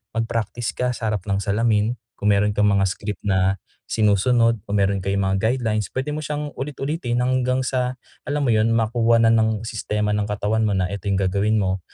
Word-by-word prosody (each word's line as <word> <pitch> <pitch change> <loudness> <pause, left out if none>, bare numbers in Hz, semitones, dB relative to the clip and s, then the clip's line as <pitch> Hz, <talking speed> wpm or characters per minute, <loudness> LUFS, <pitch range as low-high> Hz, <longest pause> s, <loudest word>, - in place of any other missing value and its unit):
mag-practice 115 +1 -2
ka 125 0 0
sa 110 - -3
harap 100 -4 -2
ng 100 0 0
salamin 105 +2 +1 0.3
kung 105 0 +2
meron 105 +1 +2
kang 105 0 +3
mga 100 -1 +3
script 105 +1 -5
na 95 -1 +2 0.3
sinusunod 115 +2 +2
o 100 - -2
meron 100 -1 +2
kayong 100 +1 -1
mga 95 - +1
guidelines, 110 -2 0
puwede 135 +3 -3
mo 150 - -3
syang 150 -1 -4
ulit-ulitin 135 -3 -2
hanggang 130 0 +1
sa, 125 -1 -1 0.3
alam 145 +1 0
mo 125 - +2
yun, 110 0 +3
makuha 115 +1 +2
na 115 - +5
ng 110 -1 +2
sistema 105 -2 -2
ng 105 0 0
katawan 105 +1 0
mo 100 - 0
na 90 -1 0
ito 100 +1 -5
yung 100 - +1
gagawin 100 +3 +1
mo 95 -2 0
110 Hz, 195 wpm, -22 LUFS, 100-120 Hz, 0.3 s, na